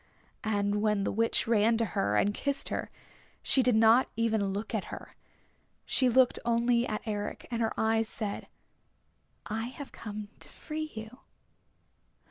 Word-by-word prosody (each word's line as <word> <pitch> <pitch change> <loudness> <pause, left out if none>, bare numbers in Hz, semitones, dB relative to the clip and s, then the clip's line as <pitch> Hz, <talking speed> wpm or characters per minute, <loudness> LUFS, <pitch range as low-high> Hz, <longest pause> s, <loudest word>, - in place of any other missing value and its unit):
And 205 -1 0
when 210 -2 +1
the - - 0
Witch 230 +2 +1
ran 225 0 +3
to 230 - +1
her 105 - 0
and 205 - +2
kissed 280 +5 0
her - - -3 0.5
she 265 - +4
did 250 -2 +3
not 225 +3 +5
even 220 -3 +1
look 205 +4 -4
at 215 -4 -1
her. - - -9 0.7
She 255 -1 +2
looked 255 +1 +4
only 235 +1 +2
at 215 - -3
Eric, 205 -2 -4
and 235 -1 -1
her 225 - +1
eyes 225 0 +2
said, 210 -3 -4 1.0
"I 225 +1 -3
have 275 +2 -9
come 210 -1 -7
to - - -8
free 310 0 -6
you." 220 +3 -8
225 Hz, 155 wpm, -30 LUFS, 210-235 Hz, 1.0 s, not